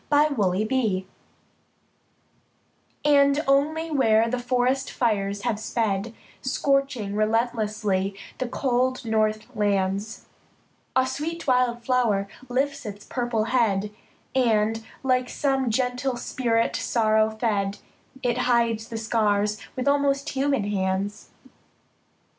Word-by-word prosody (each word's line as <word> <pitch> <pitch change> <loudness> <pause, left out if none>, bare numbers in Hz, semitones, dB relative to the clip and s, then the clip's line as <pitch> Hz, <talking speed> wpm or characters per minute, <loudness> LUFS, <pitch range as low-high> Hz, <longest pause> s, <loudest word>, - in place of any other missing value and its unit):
FIRE 295 0 +4
FLOWERS 210 -1 +1 2.0
And 280 -1 +5
only 310 +4 +2
where 225 -6 +3
the 250 +2 -1
forest 250 +2 0
fires 200 -4 -1
have 235 -4 -1
sped, 220 -1 -1 0.3
Scorching 270 -6 0
relentlessly 215 -3 0 0.2
the 255 - -1
cool 255 0 0
north 215 -1 0
lands, 200 0 -1 0.7
A 260 0 +4
sweet 300 +6 -4
wild 250 -2 +2
flower 230 -6 +1 0.2
lifts 275 +3 -1
its 205 -2 -8
purple 240 -3 -1
head, 210 -4 +1 0.4
And, 225 -3 +2 0.2
like 255 -1 +1
some 270 -3 0
gentle 250 +2 0
spirit 230 -2 0
sorrow 220 -2 +2
fed, 210 -3 -1 0.5
It 245 0 +1
hides 230 -2 +1
the 225 - -4
scars 210 -2 +1 0.2
with 255 +1 -3
almost 280 0 +2
human 275 -4 0
hands. 200 +1 -2
230 Hz, 105 wpm, -25 LUFS, 210-260 Hz, 2.0 s, And